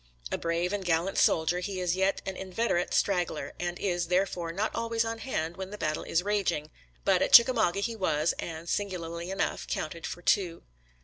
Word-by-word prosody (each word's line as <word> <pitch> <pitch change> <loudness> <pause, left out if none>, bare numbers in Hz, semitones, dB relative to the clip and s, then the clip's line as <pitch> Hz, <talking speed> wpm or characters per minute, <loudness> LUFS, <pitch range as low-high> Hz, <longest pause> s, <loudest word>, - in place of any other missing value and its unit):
A - - 0
brave 170 +3 -1
and 205 -2 -2
gallant 175 +2 +1
soldier, 165 +2 +3
he 190 +1 -4
is 180 -1 0
yet 190 +1 +1
an 190 - -3
inveterate 190 -1 -1
straggler, 180 -4 0
and 175 0 -2
is, 175 -3 -1
therefore, 180 -2 0
not 200 +6 -2
always 230 0 0
on 225 0 -3
hand 175 -10 -3
when 190 0 -5
the 210 - -7
battle 155 -5 -1
is 170 - 0
raging, 185 -7 0 0.3
but - - +4
at - - +1
Chickamauga 225 -6 +7
he 230 +2 -2
was, 160 -6 +1
and, 165 0 -6
singularly 170 -3 -3
enough, 195 +1 -2
counted 165 +2 -4
for 175 - -7
two. 175 -4 +1
180 Hz, 185 wpm, -29 LUFS, 170-200 Hz, 0.3 s, Chickamauga